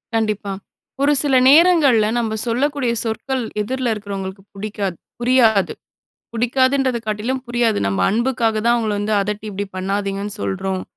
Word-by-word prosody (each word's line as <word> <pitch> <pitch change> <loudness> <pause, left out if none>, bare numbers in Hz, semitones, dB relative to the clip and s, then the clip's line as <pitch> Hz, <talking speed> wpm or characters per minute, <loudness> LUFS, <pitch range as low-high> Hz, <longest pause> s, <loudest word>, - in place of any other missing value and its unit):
கண்டிப்பா. 215 -2 -1 0.5
ஒரு 290 +1 +4
சில 280 -3 +2
நேரங்கள்ல 295 -8 +5
நம்ம 220 -2 -2
சொல்லக்கூடிய 255 +1 0
சொற்கள் 245 +3 -2 0.2
எதிர்ல 255 +2 -2
இருக்குறவோங்களுக்கு 195 -2 -6
புடிக்காது 200 -3 -4 0.2
புரியாது. 240 -5 +3 0.6
புடிக்காதுன்றதை 260 +2 +1
காட்டிலும் 225 +5 -2
புரியாது. 240 -2 +1
நம்ம, 100 0 -1
"அன்புக்காக 235 0 0
தான் 235 - +5
அவங்கள 220 -3 -1
வந்து 205 +1 -2
அதட்டி 210 +1 -3
இப்டி 200 0 -4
பண்ணாதீங்கன்னு 195 +1 -2
சொல்றோம்" 190 -1 -2
220 Hz, 125 wpm, -19 LUFS, 205-255 Hz, 0.6 s, நேரங்கள்ல